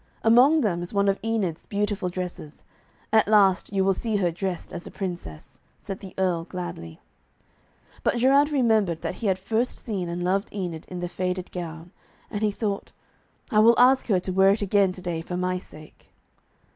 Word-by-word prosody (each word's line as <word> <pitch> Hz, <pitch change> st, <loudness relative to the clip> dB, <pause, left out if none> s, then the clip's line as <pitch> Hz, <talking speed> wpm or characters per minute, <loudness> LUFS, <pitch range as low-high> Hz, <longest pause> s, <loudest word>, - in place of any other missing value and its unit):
'Among 255 Hz, +8 st, +6 dB
them 180 Hz, -8 st, 0 dB
is 175 Hz, +4 st, -6 dB
one 200 Hz, 0 st, +3 dB
of 195 Hz, 0 st, +1 dB
Enid's 210 Hz, -8 st, -2 dB
beautiful 205 Hz, -2 st, -1 dB
dresses. 180 Hz, -4 st, -6 dB, 0.5 s
At 220 Hz, -2 st, +5 dB
last 200 Hz, -3 st, +4 dB
you 195 Hz, -1 st, +1 dB
will 195 Hz, 0 st, +3 dB
see 220 Hz, +3 st, -2 dB
her 180 Hz, -4 st, +1 dB
dressed 185 Hz, +1 st, -4 dB
as 175 Hz, -1 st, -7 dB
a -, -, -7 dB
Princess,' 175 Hz, -, -7 dB, 0.2 s
said 195 Hz, -1 st, -7 dB
the 190 Hz, -2 st, -11 dB
Earl 180 Hz, -3 st, 0 dB
gladly. 175 Hz, -, -7 dB, 1.0 s
But -, -, +1 dB
Geraint 275 Hz, +4 st, +4 dB
remembered 220 Hz, -, +2 dB
that -, -, -2 dB
he 225 Hz, -, 0 dB
had 190 Hz, -1 st, +2 dB
first 225 Hz, +6 st, -2 dB
seen 190 Hz, -6 st, -3 dB
and 175 Hz, +1 st, -3 dB
loved 195 Hz, +3 st, 0 dB
Enid 175 Hz, -5 st, -5 dB
in 180 Hz, -1 st, -6 dB
the 175 Hz, -, -2 dB
faded 180 Hz, +1 st, -3 dB
gown, 170 Hz, -1 st, -7 dB, 0.4 s
and 210 Hz, -2 st, -3 dB
he 215 Hz, -, +3 dB
thought, 205 Hz, -1 st, -3 dB, 0.6 s
'I 215 Hz, -, +4 dB
will 230 Hz, +2 st, +7 dB
ask 255 Hz, +2 st, +5 dB
her 195 Hz, -5 st, +3 dB
to 185 Hz, -, -3 dB
wear 190 Hz, +1 st, +5 dB
it 205 Hz, +1 st, +2 dB
again 200 Hz, -1 st, +3 dB
to 185 Hz, 0 st, -10 dB
day 170 Hz, -3 st, -2 dB
for 180 Hz, +2 st, -5 dB
my 180 Hz, 0 st, -1 dB
sake.' 155 Hz, -3 st, -15 dB
190 Hz, 190 wpm, -25 LUFS, 180-215 Hz, 1.0 s, will